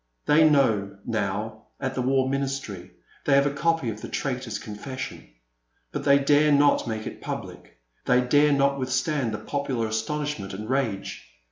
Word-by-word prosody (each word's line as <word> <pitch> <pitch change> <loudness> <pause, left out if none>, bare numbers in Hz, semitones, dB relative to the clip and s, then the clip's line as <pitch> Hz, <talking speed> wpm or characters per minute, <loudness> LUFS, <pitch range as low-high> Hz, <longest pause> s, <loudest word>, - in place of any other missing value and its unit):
They 155 +1 +6
know, 105 -9 +2
now, 110 0 -3
at 135 -1 -2
the 130 - -2
War 130 +1 +2
Ministry 135 -9 -3 0.2
— - - -30
they 140 - +4
have 140 0 +5
a 140 - 0
copy 165 -5 +1
of 110 0 -9
the - - -6
traitor's 125 -5 -3
confession 130 +5 -7 0.3
— - - -45
^but - - -3
they 140 -1 +6
dare 145 +2 +4
not 145 -2 +4
make 110 -1 -3
it - - -7
public - - -7
— - - -43
they 125 - +5
dare 145 +4 +4
not 140 0 +2
withstand 130 0 0
the 105 - -3
popular 135 -4 -2
astonishment 110 -1 -3
and 105 +2 -6
rage. 115 - -2
130 Hz, 175 wpm, -25 LUFS, 110-140 Hz, 0.3 s, They